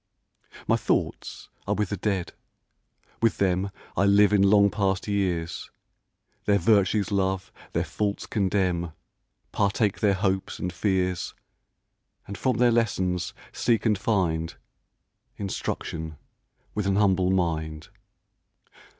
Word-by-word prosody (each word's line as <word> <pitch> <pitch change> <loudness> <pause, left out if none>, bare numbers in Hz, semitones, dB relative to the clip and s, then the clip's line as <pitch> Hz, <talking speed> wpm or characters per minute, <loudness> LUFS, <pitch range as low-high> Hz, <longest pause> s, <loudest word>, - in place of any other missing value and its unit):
My - - +4
thoughts - - -2 0.2
are - - +1
with 105 -2 -1
the 100 - -1
Dead, 95 -2 -2 0.9
with 115 -1 +2
them 95 0 +1 0.3
I 100 - +3
live 100 +1 +5
in 100 - +5
long 100 0 +5
past 100 -1 0
years, 90 -5 -1 0.8
Their 100 -1 +4
virtues 100 0 +2
love, 95 -1 0 0.2
their - - +1
faults 105 -1 -2
condemn, 95 -5 0 0.6
Partake 100 0 +1
their 100 -3 +3
hopes 95 -1 -1
and 90 -1 -3
fears, 90 -1 -1 0.9
And 100 - -7
from 125 +2 0
their 120 0 +4
lessons 95 -7 0 0.2
seek 115 -2 +1
and 110 -2 +4
find 90 -6 0 0.8
Instruction 80 -5 -4 0.6
with 105 -2 -1
^n 100 0 +2
humble 95 -3 +3
mind. 80 -4 -1
95 Hz, 115 wpm, -26 LUFS, 90-105 Hz, 0.9 s, live